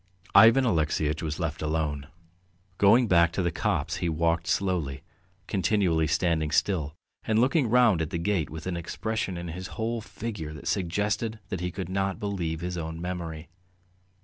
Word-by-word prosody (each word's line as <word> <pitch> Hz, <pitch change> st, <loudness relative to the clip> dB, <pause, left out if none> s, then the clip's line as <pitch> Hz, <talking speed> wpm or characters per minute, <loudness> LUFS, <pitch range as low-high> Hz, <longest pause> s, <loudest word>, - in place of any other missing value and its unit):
Ivan 115 Hz, +6 st, +7 dB
Alexeyitch 80 Hz, -5 st, 0 dB
was 75 Hz, -1 st, -3 dB
left 80 Hz, -2 st, -3 dB
alone. 75 Hz, -3 st, -2 dB, 0.7 s
Going 115 Hz, +5 st, +5 dB
back 85 Hz, -3 st, +4 dB
to 95 Hz, -, -1 dB
the 85 Hz, -, +1 dB
copse, 80 Hz, -, -1 dB
he 85 Hz, -, -1 dB
walked 85 Hz, +1 st, 0 dB
slowly, 85 Hz, -7 st, -1 dB, 0.4 s
continually 95 Hz, -5 st, +1 dB
standing 80 Hz, 0 st, +1 dB
still 75 Hz, -2 st, 0 dB, 0.3 s
and 110 Hz, -, 0 dB
looking 130 Hz, +2 st, +3 dB
round 115 Hz, -7 st, +4 dB
at 80 Hz, -, -2 dB
the -, -, -3 dB
gate 85 Hz, -2 st, 0 dB
with 80 Hz, +1 st, -8 dB
an 95 Hz, -1 st, -2 dB
expression 95 Hz, +2 st, -3 dB
in 85 Hz, 0 st, -5 dB
his 90 Hz, +3 st, -6 dB
whole 115 Hz, 0 st, -1 dB
figure 105 Hz, -9 st, -6 dB
that 75 Hz, -, -9 dB
suggested 105 Hz, +4 st, -1 dB
that 95 Hz, -, -3 dB
he 90 Hz, -, -1 dB
could 90 Hz, 0 st, -5 dB
not 95 Hz, 0 st, -1 dB
believe 85 Hz, -6 st, -3 dB
his 90 Hz, 0 st, -3 dB
own 80 Hz, 0 st, -5 dB
memory. 85 Hz, -2 st, -5 dB
85 Hz, 165 wpm, -27 LUFS, 80-100 Hz, 0.7 s, Ivan